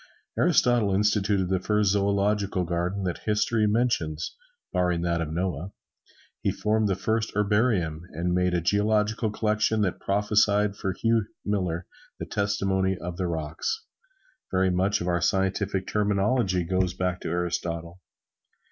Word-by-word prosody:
Aristotle 120 -5 +3
instituted 100 -2 +1
the 95 -1 +1
first 105 +1 +2
zoological 100 -1 +1
garden 90 +3 -2
that 90 -2 -2
history 105 +1 +1
mentions, 105 -9 0 0.4
barring 90 -2 +1
that 85 -1 0
of 80 -2 -3
Noah. 90 +1 -3 0.7
He - - +1
formed 110 0 +1
the 95 - +1
first 110 +3 -1
herbarium, 100 -6 +1
and 85 +2 -1
made 90 0 +2
a 85 - +1
geological 105 +4 +1
collection 110 0 +1
that 95 -4 0
prophesied 105 0 +2
for 95 -2 -2
Hugh 115 +2 +1 0.2
Miller 90 -4 -1 0.3
the - - -5
testimony 95 -2 0
of 90 -1 -6
the 90 - -1
rocks. 80 - -3 0.6
Very 95 0 +2
much 95 +3 +1
of 85 - -3
our 85 -1 +1
scientific 95 0 0
terminology 100 -1 +1
goes 90 +1 0
back 90 -1 -2
to - - -4
Aristotle. 85 0 -3
95 Hz, 140 wpm, -26 LUFS, 90-105 Hz, 0.7 s, Aristotle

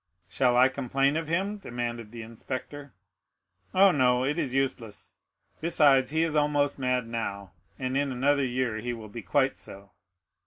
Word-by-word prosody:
"Shall 125 +5 +2
I 130 +1 +7
complain 135 +1 0
of 160 -1 -2
him?" 190 +6 -1
demanded 120 - -5
the 115 -1 -8
inspector. 130 +5 -7 0.8
"Oh, 195 +1 +6
no; 125 -4 +2
it 150 +5 -1
is 140 -6 -1
useless. 130 -5 -3 0.5
Besides, 145 -5 +4
he 160 +2 +1
is 160 -2 -1
almost 145 -1 +1
mad 125 -2 0
now, 100 -5 -4 0.3
and 130 0 -3
in 140 0 0
another 140 +3 +2
year 125 -3 -1
he 120 +2 -3
will 110 -2 -9
be 115 +3 -7
quite 135 +7 +1
so." 100 0 -12
130 Hz, 160 wpm, -27 LUFS, 120-145 Hz, 0.8 s, I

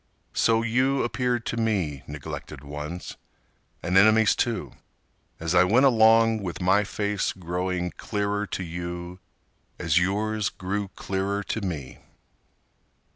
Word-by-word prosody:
So 115 0 +3
you 130 +4 +2
appeared 120 -1 -1
to 115 - -3
me, 95 - 0
neglected 75 -1 -7
ones, 75 +5 -6 0.7
And 90 +2 -1
enemies 110 +2 +6
too, 115 -5 -1 0.7
as 85 +1 -2
I 90 0 +6
went 115 +9 +4
along 115 -2 +5
With 90 -5 -5
my 95 +3 +3
face 105 -1 -1
growing 90 0 -2
clearer 105 0 -2
to 95 - -4
you 85 +1 -6 0.6
as 85 -1 +2
yours 105 +3 0
Grew 100 +2 -3
clearer 100 +1 -2
to 110 - -3
me. 80 -9 -5
100 Hz, 125 wpm, -26 LUFS, 90-110 Hz, 0.7 s, enemies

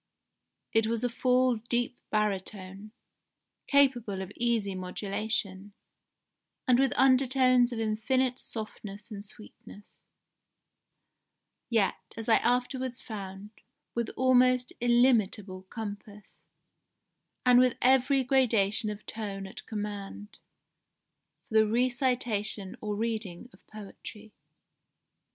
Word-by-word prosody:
It 225 0 +3
was 230 +1 -1
a 245 - +1
full 250 0 +2
deep 240 +2 -1
baritone, 200 -1 -3 0.8
capable 245 -9 +2
of 190 - -9
easy 230 -4 0
modulation, 195 +1 -3 0.9
and 250 -1 +5
with 270 -1 +3
undertones 255 -1 +4
of 235 - -4
infinite 250 +4 0
softness 210 -1 -7
and 200 -1 -7
sweetness, 210 -1 -14 1.7
yet, 220 -5 +2 0.2
as 225 - -6
I 225 - +6
afterwards 250 +1 -1
found, 200 -2 -8 0.4
with 235 -1 -2
almost 255 -1 +3
illimitable 215 -6 +2
compass, 210 -2 -8 1.1
and 250 -1 +7
with 250 -1 +3
every 265 +1 +4
gradation 225 -5 +2
of 210 0 -7
tone 200 -3 -5
at 190 - -9
command, 205 -1 -6 1.1
for - - -12
the 220 - +4
recitation 240 -4 0
or 210 -1 -3
reading 220 -1 -4
of - - -22
poetry." 215 0 -11
225 Hz, 100 wpm, -29 LUFS, 205-250 Hz, 1.7 s, and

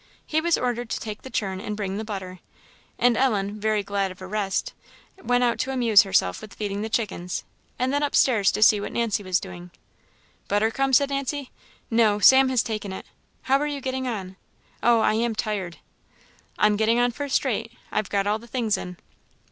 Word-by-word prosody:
He 315 0 0
was 340 0 +2
ordered 245 -2 -2
to - - -2
take 215 -1 -6
the 265 - -9
churn 190 -6 -2
and 210 0 -5
bring 195 -2 -3
the 220 - -3
butter; 190 -4 -6 0.6
and 245 -1 +3
Ellen, 210 -5 0
very 215 -1 0
glad 200 -1 -1
of 185 - -11
a 185 - -8
rest, 195 0 -2 0.5
went 245 -4 +2
out 240 -1 +1
to 265 - -1
amuse 235 -5 +5
herself 140 - +1
with 215 - -11
feeding 205 -1 -3
the 220 - -3
chickens, 195 -6 -2 0.3
and 255 +2 0
then 285 - +1
up 290 -1 -1
stairs 220 -7 +4
to 215 - +2
see 210 -1 +6
what - - -5
Nancy 230 -3 0
was 185 -2 0
doing. 180 -2 -9 0.8
"Butter 210 +2 +1
come?" 270 +2 0
said 280 +2 +4
Nancy. 275 0 -3 0.4
"No, 225 -2 +4
Sam 265 +5 +6
has 255 -3 +2
taken 215 -3 -4
it. 190 - -7 0.4
How 270 +1 +3
are 295 - -1
you 290 -1 -3
getting 260 0 -3
on? 190 -5 -5 0.4
Oh, 235 -1 +4
I - - +3
am 230 +1 0
tired!" 200 -5 -3 0.8
"I'm 210 0 +3
getting 225 +2 +2
on 245 0 +3
first 280 +3 -1
rate; 230 -2 -2 0.2
I've 215 -2 -1
got 200 -1 0
all 210 +2 0
the 235 - -14
things 230 -4 0
in." 180 -1 -7
220 Hz, 205 wpm, -24 LUFS, 200-250 Hz, 0.8 s, see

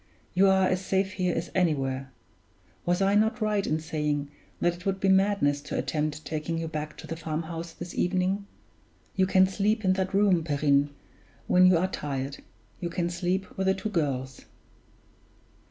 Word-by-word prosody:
"You 190 +2 +5
are 190 0 +4
as 185 +1 0
safe 190 0 0
here 180 -2 -1
as 165 +1 -3
anywhere. 135 -7 0 0.8
Was 175 +2 +2
I 195 +1 +3
not 220 +3 +2
right 210 -2 0
in 155 - +1
saying 150 -2 -2 0.3
that 175 0 +1
it 180 - -14
would 195 0 -1
be 195 - +2
madness 190 -7 +3
to - - -5
attempt 155 0 -2
taking 160 +1 -3
you 165 0 -2
back 155 -1 -5
to - - -9
the 165 - -5
farmhouse 165 +1 -4
this 175 0 -8
evening? 185 +2 0 0.7
You 190 -1 +3
can 190 0 +5
sleep 205 +3 0
in 185 - +4
that 190 0 -1
room, 195 -4 +4
Perrine, 145 -2 +2 0.6
when 185 0 +5
you 185 -2 +5
are 175 - +2
tired 140 -5 -4 0.4
you 175 - -3
can 170 0 -1
sleep 180 +2 -1
with 190 0 -1
the 190 - +3
two 215 +3 -4
girls." 135 -8 -2
175 Hz, 175 wpm, -27 LUFS, 155-190 Hz, 0.8 s, You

